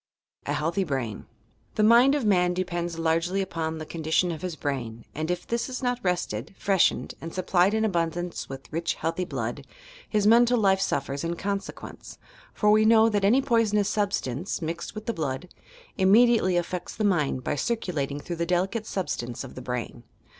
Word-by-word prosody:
A - - 0
HBAI.THY 165 +6 0
BRAIN 130 - -3 0.5
The 215 - +2
mind 240 +6 +6
of 280 -6 -1
man 180 -3 +3
depends 175 -2 -2
largely 165 +3 +1
upon 165 -4 -2
the 155 - -6
condition 160 +2 0
of 160 -2 -6
his 180 -3 -4
brain 120 -7 -4
and, 155 +2 -3
if 180 0 -2
this 235 +2 -2
is 255 +1 -5
not 245 -1 0
rested, 175 - -2
freshened 195 -3 +2
and 165 - -6
supplied 185 +2 +2
in 220 0 +2
abundance 175 -2 -2
with 135 +2 -9
rich, 170 +1 -1
healthy 165 +3 -2
blood, - - -4 0.5
hia 210 -2 +2
mental 240 +3 +5
life 195 -3 +3
suffers 140 +1 -1
in 170 +1 -2
consequence, 200 +2 -5 0.3
for 210 -1 +2
we 215 +1 +5
know 225 0 +6
that 205 -2 0
any 245 +7 +4
poisonous 210 -4 +2
substance, 195 - -1
mixed 170 +3 -5
with 215 - -7
the 230 - -1
blood, 155 +1 -3 0.5
imm^ 205 +6 +6
diately 185 -7 +2
affects 175 +1 -3
the 215 - -2
mind 150 -10 +1
by - - -1
circulating 145 - -2
through 170 +3 -6
the 170 - 0
deli 180 +2 +2
cate 220 +1 -5
substance 120 - -3
of 135 - -10
the 130 - -8
brain. 125 -1 -4
180 Hz, 180 wpm, -26 LUFS, 160-210 Hz, 0.5 s, mind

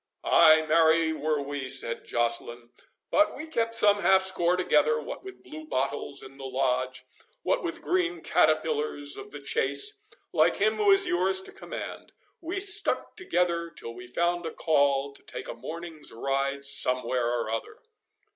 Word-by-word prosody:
"Ay, 160 -1 +6
marry, 160 0 +3
were 155 -1 -1
we," 140 -2 -5
said 125 -3 -1
Joceline; 120 0 -2 0.4
"but 305 - +3
we 305 - -7
kept 230 -7 -2
some 205 -2 +4
half 190 -1 +5
score 180 -2 +1
together, 155 -3 +2
what 150 - -8
with 385 -1 -12
blue 310 0 -10
bottles 140 - -3
in 135 +1 -13
the - - -9
Lodge, 130 -1 -2 0.4
what - - 0
with - - -5
green 355 -1 -1
caterpillars 445 -10 0
of 410 0 -9
the - - -9
chase, 420 -2 -1 0.3
like - - +3
him 445 - +1
who 420 -1 +2
is 390 0 +5
yours 190 - +1
to - - -11
command; - - -8 0.3
we 350 +4 -4
stuck 395 +1 +3
together 175 - -1
till 115 -7 -9
we 120 +1 -11
found 175 +6 -1
a - - -5
call 140 -3 +1
to - - -13
take - - -8
a - - -5
morning's 165 -2 -9
ride 135 +3 -2
somewhere 125 -3 +3
or 110 - -3
other." 115 - -5
160 Hz, 165 wpm, -27 LUFS, -, 0.4 s, Ay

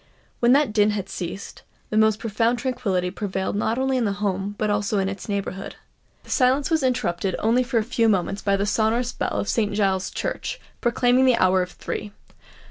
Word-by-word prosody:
When 240 0 +4
that 280 -5 +3
din 210 -1 +4
had 195 -1 -5
ceased, 185 +2 -6 0.3
the - - -1
most 220 -1 +4
profound 225 +2 0
tranquillity 210 -9 -1
prevailed 195 -1 -3
not 220 +3 0
only 265 0 +1
in 250 - +1
the 200 - 0
home 200 0 -2
but 215 -1 0
also 205 0 0
in 195 -1 +1
its 195 +2 -6
neighbourhood. 195 -1 -4 0.5
That - - -18
silence 265 +4 +2
was 320 -1 +3
interrupted 195 -8 0
only 230 +3 +2
for 245 -1 -1
a 220 - +3
few 230 0 +1
moments 195 0 0
by 200 -1 +1
the 200 - 0
sonorous 225 +4 +1
bell - - -2
of - - -2
St. 210 -4 0
Giles's 190 -3 +1
Church, - - -4 0.2
proclaiming 245 +1 +3
the 255 -2 +4
hour 185 0 +4
of 180 0 -4
three. 210 -1 -5
210 Hz, 200 wpm, -23 LUFS, 195-245 Hz, 0.5 s, When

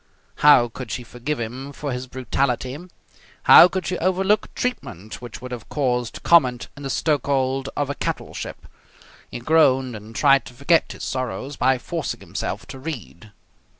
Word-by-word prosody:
How 145 -5 +6
could 120 +1 -8
she 125 +3 -4
forgive 125 +5 -4
him 125 +5 -5
for 145 0 -5
his 125 +1 -4
brutality? 130 0 -1 0.7
How - - +10
could 185 0 -4
she 185 - -2
overlook 190 +4 +1
treatment 110 - -4
which 120 +1 -9
would 125 - -7
have 120 -2 -7
caused 125 -5 -1
comment 125 -8 +4
in 145 - -11
the 135 - -4
stokehold 135 -2 0
of 145 - 0
a 140 - -2
cattle - - -4
ship? - - -7 0.6
He - - -6
groaned 130 -2 +3
and 110 +2 -11
tried 140 -2 +4
to 125 - -12
forget 150 +6 +2
his - - -9
sorrows 130 +2 -4
by 130 0 +2
forcing 120 - -4
himself - - -5
to 135 - -8
read. 120 - -8
130 Hz, 165 wpm, -22 LUFS, 125-145 Hz, 0.7 s, How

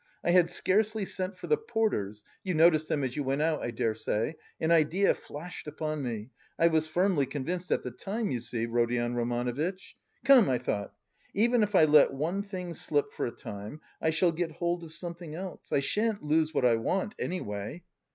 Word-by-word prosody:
I 175 - +2
had 175 -1 +5
scarcely 210 +4 +1
sent 185 0 -4
for - - -8
the 455 - +3
porters 160 - -1 0.2
(you 185 -3 -1
noticed 155 -1 +5
them 145 - 0
as 130 -2 -2
you 150 - -1
went 135 +2 0
out, 160 -1 +1
I - - -2
dare 115 -1 0
say). 110 +6 -2 0.2
An 160 - +1
idea 170 +4 +4
flashed 165 +3 -9
upon 155 0 -3
me; 115 -2 -4 0.3
I 170 - +5
was 160 -1 +1
firmly 175 -4 +2
convinced 170 +7 -4
at - - +1
the 125 - -4
time, 205 - -3
you 125 -3 -2
see, 115 -1 -2
Rodion 120 +1 0
Romanovitch. 120 +10 -2 0.3
Come, 265 - +7
I 130 - +2
thought 105 -4 -3 0.4
even 235 +3 +3
if 210 -1 +1
I 160 - +7
let 150 -2 +6
one 165 +8 -1
thing 185 -4 -6
slip 145 -2 -1
for - - -2
a - - -4
time, 105 +5 -8 0.2
I 160 - +2
shall 165 +2 +3
get 165 0 -3
hold 170 +1 -1
of 160 - -10
something 170 -2 -7
else 185 +1 -8
I 140 - +3
shan't 210 +6 0
lose 155 +1 +2
what 130 - +1
I 115 -2 +5
want, 190 - -1
anyway. 105 - -4
160 Hz, 200 wpm, -29 LUFS, 125-185 Hz, 0.4 s, Come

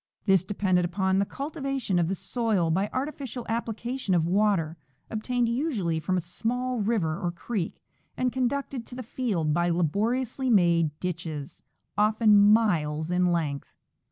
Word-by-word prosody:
This 195 -4 +4
depended 185 -2 +1
upon 190 +2 +1
the 200 - +1
cultivation 275 - -2
of 170 - +2
the 190 - -1
soil 195 -3 0
by 195 +5 +1
artificial 260 -3 -4
application 230 -1 -2
of 165 -2 +2
water, 185 -4 +2 0.4
obtained 240 +2 0
usually 230 - 0
from 185 +3 0
a - - 0
small 245 +8 -2
river 200 -6 0
or 175 -3 -1
creek, 180 +1 -4 0.3
and 250 -1 0
conducted 260 -1 -2
to 245 - -8
the 255 - -5
field 200 - -1
by 175 +2 +2
laboriously 225 - 0
made 170 -7 +4
ditches, 160 -5 -5 0.4
often 210 -1 +5
miles 160 -8 +2
in 180 0 +3
length. 150 -5 -2
200 Hz, 145 wpm, -27 LUFS, 175-240 Hz, 0.4 s, often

